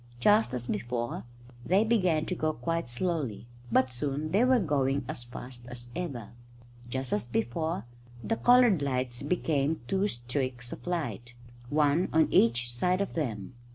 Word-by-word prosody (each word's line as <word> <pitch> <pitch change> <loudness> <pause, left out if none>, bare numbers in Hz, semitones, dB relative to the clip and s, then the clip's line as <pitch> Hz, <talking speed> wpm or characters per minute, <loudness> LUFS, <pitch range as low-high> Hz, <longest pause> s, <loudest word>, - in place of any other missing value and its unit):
Just 210 - +4
as 120 -1 -3
before, 120 -1 -3 0.4
they 190 - +3
began 185 -9 +2
to - - -2
go 155 -3 0
quite 165 +1 -2
slowly, 135 - -2 0.3
but 130 +2 +3
soon 145 +4 -2
they 205 +5 +4
were 255 0 +5
going 140 - +1
as 120 - -6
fast 120 0 -9
as 120 0 -8
ever. 140 - -4 0.6
Just 130 +1 -3
as 105 +3 -1
before, 120 +3 -1 0.4
the 225 - 0
coloured 245 - +5
lights 125 -3 -1
became 150 -1 0
two 195 +5 +1
streaks 125 - -3
of - - -11
light, 145 -8 -3 0.3
one 150 +4 +2
on 160 0 +4
each 120 +1 +3
side 180 +9 +1
of 200 - -2
them. 115 - -3
140 Hz, 155 wpm, -29 LUFS, 120-170 Hz, 0.6 s, were